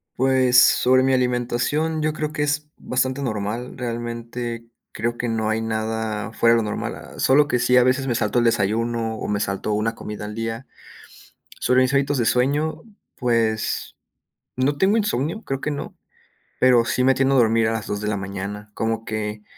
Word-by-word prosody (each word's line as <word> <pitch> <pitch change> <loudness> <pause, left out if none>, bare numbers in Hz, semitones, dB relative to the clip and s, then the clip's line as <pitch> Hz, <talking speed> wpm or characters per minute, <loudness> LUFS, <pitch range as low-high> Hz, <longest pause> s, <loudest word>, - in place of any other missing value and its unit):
Pues, 130 -1 +4
sobre 130 +1 +5
mi 135 0 +2
alimentación, 125 +5 0
yo 155 0 +1
creo 155 0 -4
que 150 - -1
es 150 +1 -1
bastante 130 +2 -1
normal. 110 0 -3
Realmente, 120 0 -5 0.3
creo 120 +2 -2
que 120 - -2
no 110 -1 -1
hay 110 +1 0
nada 110 -1 -3
fuera 115 +1 +4
de - - +3
lo 105 - -3
normal. - - -3
Ah, - - -12
solo 145 +2 +4
que 125 - +1
sí, 125 +1 +3
a 125 - +6
veces 130 +2 +1
me 120 - 0
salto 120 - +1
el 120 - +2
desayuno, 115 +1 0
o - - -5
me 105 -1 0
salto 100 +1 -2
1 110 +2 -1
comida 105 -1 -7
al 105 0 -7
día. 115 +3 -4 0.9
Sobre 125 +1 +3
mis 130 +1 +1
hábitos 140 0 +1
de 120 - +1
sueño, 140 +7 +1 0.3
pues, 115 -3 -1 0.6
no 135 +3 0
tengo 190 +6 +3
insomnio, 205 - -1
creo 135 -1 -3
que 150 - -2
no, 145 - -6 0.6
pero 125 -2 +5
sí 125 0 0
me 135 +1 +5
tiendo 135 +1 +2
a - - +4
dormir 115 -2 +3
a - - +1
las 110 -2 -3
2 105 0 -3
de 105 - -3
la 105 -1 -1
mañana. 100 +2 -6
Como 115 +1 -2
que 105 -1 -4
120 Hz, 195 wpm, -22 LUFS, 110-130 Hz, 0.9 s, a